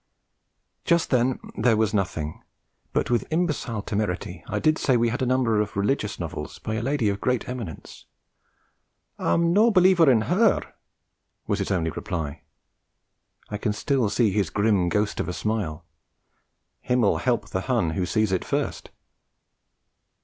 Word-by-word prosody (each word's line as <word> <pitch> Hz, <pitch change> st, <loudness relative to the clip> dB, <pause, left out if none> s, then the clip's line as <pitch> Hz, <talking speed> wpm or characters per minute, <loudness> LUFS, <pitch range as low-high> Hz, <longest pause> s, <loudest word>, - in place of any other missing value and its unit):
Just 170 Hz, -2 st, +2 dB
then 125 Hz, 0 st, +2 dB, 0.2 s
there 115 Hz, 0 st, +3 dB
was 110 Hz, -1 st, +1 dB
nothing; 80 Hz, -6 st, -2 dB, 0.5 s
but -, -, -1 dB
with 120 Hz, -4 st, +1 dB
imbecile 150 Hz, -, -1 dB
temerity 95 Hz, -5 st, -3 dB
I -, -, -2 dB
did 155 Hz, 0 st, +2 dB
say 130 Hz, -3 st, +3 dB
we 115 Hz, 0 st, +2 dB
had 125 Hz, +4 st, -3 dB
a 130 Hz, -, +1 dB
number 120 Hz, -4 st, +2 dB
of 105 Hz, -, -4 dB
'religious 105 Hz, +1 st, 0 dB
novels' -, -, -5 dB
by 110 Hz, -, -5 dB
a 110 Hz, -, -1 dB
lady 135 Hz, -2 st, 0 dB
of 100 Hz, 0 st, -1 dB
great 125 Hz, -2 st, 0 dB
eminence. 120 Hz, -10 st, -7 dB, 1.1 s
'I'm 170 Hz, 0 st, +2 dB
no 215 Hz, +4 st, +5 dB
a -, -, +4 dB
believer 185 Hz, -5 st, +5 dB
in 120 Hz, -4 st, +4 dB
her,' 195 Hz, -, +2 dB, 0.7 s
was -, -, -1 dB
his -, -, -2 dB
only 85 Hz, -4 st, 0 dB
reply. 80 Hz, -2 st, -4 dB, 1.1 s
I 105 Hz, -, -3 dB
can 105 Hz, -, 0 dB
still 125 Hz, +1 st, 0 dB
see 110 Hz, -1 st, +2 dB
his 100 Hz, -4 st, 0 dB
grim 100 Hz, -2 st, +2 dB
ghost 105 Hz, +2 st, 0 dB
of -, -, -2 dB
a -, -, -3 dB
smile. 90 Hz, -7 st, -3 dB, 0.9 s
Himmel 125 Hz, -4 st, +2 dB
help 125 Hz, -2 st, 0 dB
the 95 Hz, -, -2 dB
Hun 115 Hz, -8 st, 0 dB
who 90 Hz, +2 st, -2 dB
sees 110 Hz, -3 st, +1 dB
it 95 Hz, -, 0 dB
first! -, -, -3 dB
110 Hz, 155 wpm, -25 LUFS, 100-130 Hz, 1.1 s, no